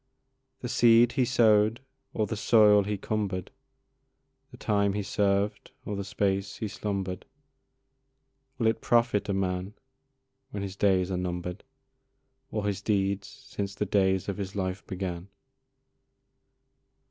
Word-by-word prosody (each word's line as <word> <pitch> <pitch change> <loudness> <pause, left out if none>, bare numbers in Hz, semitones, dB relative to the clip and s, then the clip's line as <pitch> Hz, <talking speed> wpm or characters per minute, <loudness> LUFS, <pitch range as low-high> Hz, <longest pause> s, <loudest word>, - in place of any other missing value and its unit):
The 125 - -4
seed 120 0 +5
he 130 -2 +1
sow'd 110 -3 +4 0.3
or 110 - 0
the 105 - -4
soil 105 -1 +5
he 105 0 -2
cumber'd, 100 -3 -3 1.0
The - - -13
time 100 -1 +1
he 105 0 -2
served 100 +1 0 0.2
or 105 - -3
the 100 - -3
space 100 0 -1
he 110 - -3
slumber'd, 95 -3 -4 1.3
Will 120 - -1
it 110 0 +2
profit 120 -4 +2
a - - +1
man 95 +1 -2 0.7
when 100 -1 -5
his 95 -1 -5
days 95 -2 +2
are 90 - -1
number'd, 90 +1 -4 0.9
Or 105 -6 -3
his 100 -1 -2
deeds 100 -1 0
since 100 -1 -6
the 105 - -1
days 95 -2 +1
of 100 - -3
his 100 -1 -5
life 95 -1 -3
began? 90 -1 -4
100 Hz, 135 wpm, -28 LUFS, 95-105 Hz, 1.3 s, seed